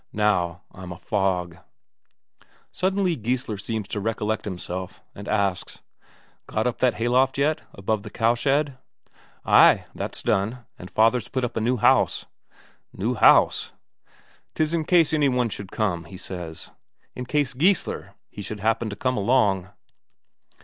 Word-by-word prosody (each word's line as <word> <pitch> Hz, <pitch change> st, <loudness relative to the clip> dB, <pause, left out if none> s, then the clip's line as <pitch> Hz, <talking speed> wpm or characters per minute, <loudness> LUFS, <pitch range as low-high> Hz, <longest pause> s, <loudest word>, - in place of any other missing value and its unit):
Now 90 Hz, -5 st, +1 dB
I'm 90 Hz, -1 st, -9 dB
a 90 Hz, -, -7 dB
fog." 90 Hz, -3 st, -1 dB, 1.1 s
Suddenly 190 Hz, -2 st, 0 dB
Geissler 120 Hz, -3 st, -2 dB
seems 110 Hz, 0 st, -4 dB
to 105 Hz, -, -3 dB
recollect 110 Hz, 0 st, -2 dB
himself, 90 Hz, -1 st, -6 dB
and 100 Hz, 0 st, -10 dB
asks: 100 Hz, -4 st, -1 dB, 0.7 s
"Got 110 Hz, -, -1 dB
up 125 Hz, -, -1 dB
that 125 Hz, -2 st, +2 dB
hayloft 125 Hz, +3 st, +2 dB
yet, 155 Hz, +3 st, +1 dB
above 100 Hz, +2 st, -1 dB
the 105 Hz, -, -9 dB
cowshed?" 135 Hz, +7 st, +1 dB, 0.7 s
"Ay, -, -, +6 dB
that's -, -, -5 dB
done. 115 Hz, +5 st, 0 dB
And 90 Hz, -, -9 dB
father's 115 Hz, +2 st, +2 dB
put 130 Hz, -1 st, -2 dB
up 120 Hz, -, -6 dB
a 110 Hz, -, -1 dB
new 125 Hz, +3 st, +1 dB
house." -, -, +3 dB, 0.7 s
"New 110 Hz, +6 st, -2 dB
house?" 120 Hz, -, +4 dB, 0.8 s
"'Tis 155 Hz, +1 st, 0 dB
in 165 Hz, -2 st, 0 dB
case 165 Hz, -3 st, +4 dB
any 150 Hz, -3 st, +3 dB
one 125 Hz, -2 st, +1 dB
should 100 Hz, -2 st, -8 dB
come, 90 Hz, -7 st, -1 dB
he 90 Hz, +4 st, -11 dB
says 85 Hz, -4 st, -8 dB, 0.4 s
in 125 Hz, -, -6 dB
case 145 Hz, 0 st, 0 dB
Geissler 170 Hz, +8 st, 0 dB, 0.2 s
he 105 Hz, -, -8 dB
should 105 Hz, +1 st, -6 dB
happen 115 Hz, +1 st, +1 dB
to 100 Hz, -, -6 dB
come 125 Hz, +4 st, -1 dB
along." 100 Hz, -4 st, +2 dB
110 Hz, 145 wpm, -24 LUFS, 100-130 Hz, 1.1 s, Ay